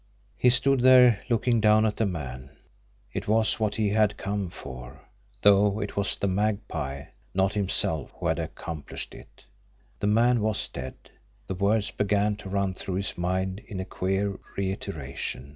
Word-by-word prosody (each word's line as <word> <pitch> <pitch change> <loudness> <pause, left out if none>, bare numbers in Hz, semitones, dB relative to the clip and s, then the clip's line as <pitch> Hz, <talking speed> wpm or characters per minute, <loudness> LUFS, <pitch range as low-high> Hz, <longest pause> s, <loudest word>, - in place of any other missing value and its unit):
He 125 - +4
stood 135 +2 +4
there 125 -4 +7
looking 120 0 +2
down 110 0 +5
at 105 -1 -1
the 110 - +1
man. 65 -7 -6 0.6
It - - -4
was 110 +1 +2
what 105 -2 0
he 110 -2 +1
had 105 0 +2
come 100 -2 -3
for 65 -6 -10 0.4
though 100 0 +5
it 100 -1 -4
was 100 - 0
the - - -2
Magpie, 95 -8 -2 0.3
not 95 +1 +2
himself, 95 - 0
who - - -6
had - - +1
accomplished 80 -4 -6
it! - - -15 0.5
The 105 - 0
man 115 +2 +3
was 110 -1 0
dead! 65 - -7 0.5
The - - -4
words 100 +3 +1
began 105 +1 +1
to 100 -2 -9
run 100 -1 0
through 95 0 -4
his 100 +1 -2
mind 95 +2 -1
in 100 - -6
a 95 - -3
queer 95 +2 -1 0.2
reiteration. 80 -9 -4
100 Hz, 160 wpm, -27 LUFS, 95-110 Hz, 0.6 s, there